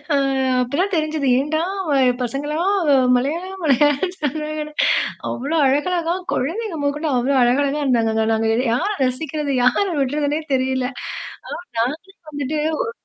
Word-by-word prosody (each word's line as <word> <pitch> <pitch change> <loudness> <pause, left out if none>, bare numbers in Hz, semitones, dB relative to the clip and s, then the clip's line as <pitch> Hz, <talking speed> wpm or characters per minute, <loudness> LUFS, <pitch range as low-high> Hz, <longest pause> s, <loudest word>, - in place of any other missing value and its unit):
ஆ, - - +4 0.4
அப்ப 250 0 -3
தான் 395 0 -1
தெரிஞ்சது. 310 -2 -1
ஏன்டா 310 +3 0 0.6
பசங்கள்லாம் 300 - -1 0.4
மலையாளம், 345 +9 -3
மலையாளம் 290 -1 +3
என்று 365 0 -6
சொன்னாங்கன்னு. 305 +1 -3 0.6
அவ்வளோ 280 +6 -3
அழகழகா 335 +5 +1 0.2
கொழந்தைங்க 350 - -2
மொதற்கொண்டு 295 +2 -1
அவ்வளோ 255 +3 +1
அழகழகா 280 +4 +2
இருந்தாங்க. 230 -4 +2 0.2
நாங்க, 225 0 +1 0.2
யார 330 - 0 0.2
ரசிக்கிறது, 285 +2 -2
யார 250 +11 +3 0.2
விட்றதுன்னே 290 +3 0
தெரியலை. 260 0 0 0.7
ஆனா 235 -10 -4
நாங்களும் 335 +2 -11
வந்துட்டு 290 +1 -2 0.3
ஒரு - - -4
295 Hz, 125 wpm, -20 LUFS, 265-320 Hz, 0.7 s, ஆ